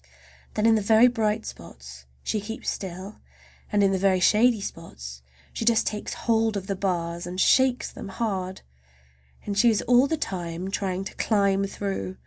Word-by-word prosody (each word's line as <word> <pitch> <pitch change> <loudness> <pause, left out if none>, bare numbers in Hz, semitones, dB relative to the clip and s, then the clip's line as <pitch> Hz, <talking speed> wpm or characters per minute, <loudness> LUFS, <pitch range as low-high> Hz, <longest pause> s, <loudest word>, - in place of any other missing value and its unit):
Then 210 - +1
in 225 - +6
the 220 - +2
very 220 +4 +6
bright 220 -3 0
spots 65 +1 -11 0.2
she 215 - -1
keeps 225 +2 -4
still, 190 +2 -7 0.5
and 205 -1 +3
in 195 - +4
the 190 - 0
very 190 -1 +3
shady 220 +5 +4
spots 65 - -8 0.3
she - - -3
just 230 0 +3
takes 210 -1 -3
hold 225 -2 +2
of 190 - -5
the 195 -1 -2
bars 175 -3 -2
and 180 +1 -5
shakes 260 +3 +3
them - - -8
hard. 190 -3 -3 0.8
And 205 - -3
she 235 +4 +5
is 220 - +1
all 250 +3 +4
the 320 - -1
time 180 - -4
trying 190 -2 -2
to 195 - -7
climb 200 -2 +2
through. 195 -1 -4
200 Hz, 175 wpm, -25 LUFS, 185-220 Hz, 0.8 s, in